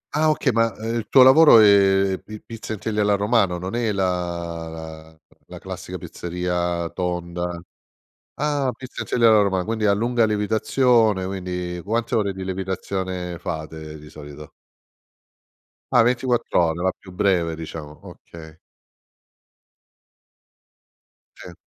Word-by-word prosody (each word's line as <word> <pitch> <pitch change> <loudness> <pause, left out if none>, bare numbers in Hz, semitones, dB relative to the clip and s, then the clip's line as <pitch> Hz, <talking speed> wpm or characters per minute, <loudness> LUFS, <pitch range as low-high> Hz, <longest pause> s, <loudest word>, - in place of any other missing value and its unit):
Ah 155 +1 +3
okay, 150 -3 +1
ma, 115 0 +2
ehm, 115 +1 -4
il 110 -2 -4
tuo 130 - +7
lavoro 140 -1 +8
è 100 -2 +4
pi 110 0 -9
pizza 115 -1 -8
in - - -5
teglia 105 +1 -2
alla 105 0 +3
romana, 100 -3 +1
non 90 +4 -6
è 115 -2 0
la 85 -3 -3 0.4
la 80 - -23 0.3
la - - -10
classica - - -7
pizzeria 90 -1 -3
tonda. 90 0 -4 0.8
Ah, 145 -2 -1
pizza 130 -1 -9
in - - -11
teglia 115 -1 +3
alla 110 -1 +6
romana, 95 -2 0
quindi 110 0 -1
a 100 - +4
lunga 120 +2 +1
lievitazione, 110 -1 +2
quindi, 90 -2 -5
quante 115 +5 -2
ore 100 -3 +1
di 95 0 -7
lievitazione 95 -1 -4
fate 80 -2 -6
di 75 0 -13
solito? 75 0 -11 1.4
Ah 125 - +5
24 120 -5 +1
ore, 80 +2 -4
la 95 0 +1
più 95 - -14
breve 90 -4 0
diciamo, 80 -2 -9
okay. 80 -1 -13 2.8
Sì. 90 - -11
95 Hz, 135 wpm, -22 LUFS, 85-110 Hz, 2.8 s, lavoro